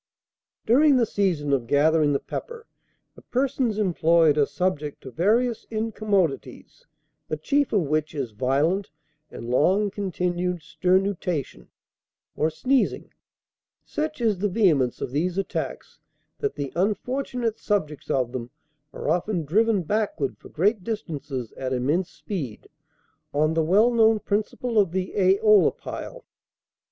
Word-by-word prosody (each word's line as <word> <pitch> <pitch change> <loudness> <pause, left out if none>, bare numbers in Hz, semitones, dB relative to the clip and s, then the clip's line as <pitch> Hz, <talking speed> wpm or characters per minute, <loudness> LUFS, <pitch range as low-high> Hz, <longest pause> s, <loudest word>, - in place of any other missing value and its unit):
"During 275 +4 +5
the 240 - +3
season 175 -10 0
of 125 -4 0
gathering 150 +2 +3
the 140 - +1
pepper, 470 -1 -7 0.5
the - - -16
persons 255 -4 -1
employed 170 -6 +3
are 145 -2 +3
subject 150 -1 -2
to 130 - -8
various 225 - +1
incommodities, 210 - -2 0.4
the 155 - -3
chief 280 - +1
of 205 - +3
which 155 +1 -1
is 135 -6 -3
violent 140 - 0 0.4
and 115 - -8
long 190 +10 +3
continued 180 -3 -2
sternutation, 180 - -1 0.7
or 155 - +1
sneezing. 255 - 0 0.7
Such 305 -3 -3
is 215 -5 +1
the 205 +2 0
vehemence 165 - +2
of - - -3
these 175 +6 -1
attacks, 195 - -4 0.4
that 425 - -2
the 140 -2 -5
unfortunate 235 +4 -1
subjects 155 -8 -2
of 125 -3 0
them 125 -2 -5 0.4
are - - -6
often 175 +1 0
driven 210 +4 +2
backward 200 -6 -1
for - - -14
great 200 +4 +1
distances 145 - -5
at 130 -1 -3
immense 150 +9 0
speed, 145 - -6 0.7
on 155 +2 +2
the 165 - +2
well 205 +9 +4
known 225 -1 +4
principle 215 +3 -1
of 190 -5 +2
the 185 0 -2
æolipile. 205 - +2
185 Hz, 130 wpm, -25 LUFS, 150-215 Hz, 0.7 s, During